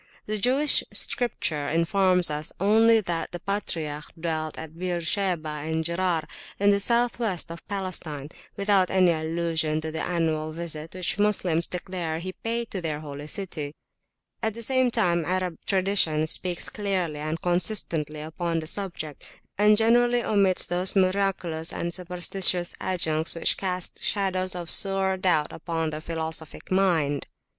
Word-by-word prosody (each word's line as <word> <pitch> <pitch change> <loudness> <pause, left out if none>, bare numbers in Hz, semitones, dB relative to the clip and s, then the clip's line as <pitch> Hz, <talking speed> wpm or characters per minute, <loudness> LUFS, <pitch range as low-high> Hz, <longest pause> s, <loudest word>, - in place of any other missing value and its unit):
The 215 0 -2
Jewish 270 +7 +4
Scripture 160 - 0
informs 180 +1 +3
us 150 +1 -2
only 220 +3 +5
that 170 -4 -3
the 175 - -6
patriarch 160 -7 -3
dwelt 160 -2 -2
at 160 0 -8
Beersheba 180 -1 0 0.2
and 160 +1 -1
Gerar, 170 -1 0 0.3
in 200 +1 +5
the 200 - +3
south 235 +3 +1
west 190 -8 -1
of 170 - -10
Palestine, 175 -7 -3 0.3
without 200 -2 +3
any 185 -2 +4
allusion 160 -1 0
to 160 0 -4
the 160 - -3
annual 160 -3 -1
visit 160 -1 -4
which 185 +2 -2
Moslems 185 -5 +2
declare 180 -3 -4
he 185 +3 -5
paid 230 +3 -3
to 190 - -3
their 155 -3 -3
Holy 145 -1 -7
City. 155 -5 -4 0.7
At 220 -2 -1
the 230 - -4
same 260 +1 +2
time 175 -8 +2
Arab 180 -1 -1
tradition 185 -5 +3
speaks 175 +2 0
clearly 185 -7 -2
and 155 +2 -3
consistently 170 -4 -1
upon 165 +2 -3
the 160 - -6
subject, 160 -5 -4 0.3
and 210 0 +6
generally 240 +2 +4
omits 195 -3 +3
those 180 +3 0
miraculous 185 -4 +1
and 170 0 -3
superstitious 180 0 0
adjuncts 160 -3 0
which 165 - +3
cast 185 -2 -3
shadows 185 -2 0
of 175 -2 -4
sore 195 -1 +5
doubt 180 -5 +1
upon 165 -1 -3
the 155 0 -5
philosophic 160 0 -3
mind. 170 -7 +2
175 Hz, 145 wpm, -26 LUFS, 160-195 Hz, 0.7 s, and